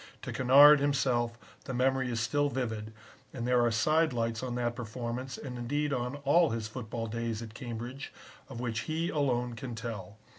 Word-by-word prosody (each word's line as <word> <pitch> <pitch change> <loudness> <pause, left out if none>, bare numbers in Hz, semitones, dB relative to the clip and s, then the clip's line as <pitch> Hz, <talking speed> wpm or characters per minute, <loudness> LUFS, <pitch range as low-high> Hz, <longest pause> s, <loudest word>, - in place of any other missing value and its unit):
To - - -5
Kennard 140 +4 +8
himself 125 -4 +1 0.3
the 130 - -4
memory 130 0 +1
is 115 -1 -1
still 145 +6 +1
vivid, 110 -5 -3 0.4
and 120 -1 -3
there 125 -1 +4
are 120 - +3
side 155 +7 +2
lights 115 -1 -1
on 125 -2 -3
that 120 -1 -1
performance 120 +2 -5
and 125 -3 -7
indeed 145 +4 -1
on 125 +1 -2
all 165 +3 +5
his 115 -1 -3
football 115 0 -5
days 115 0 -3
at 110 -2 -9
Cambridge, 120 +3 -6 0.4
of 115 - -7
which 120 -3 -2
he 165 +2 -1
alone 125 -5 0
can 120 +1 -6
tell. 110 -3 -6
120 Hz, 180 wpm, -30 LUFS, 115-135 Hz, 0.4 s, Kennard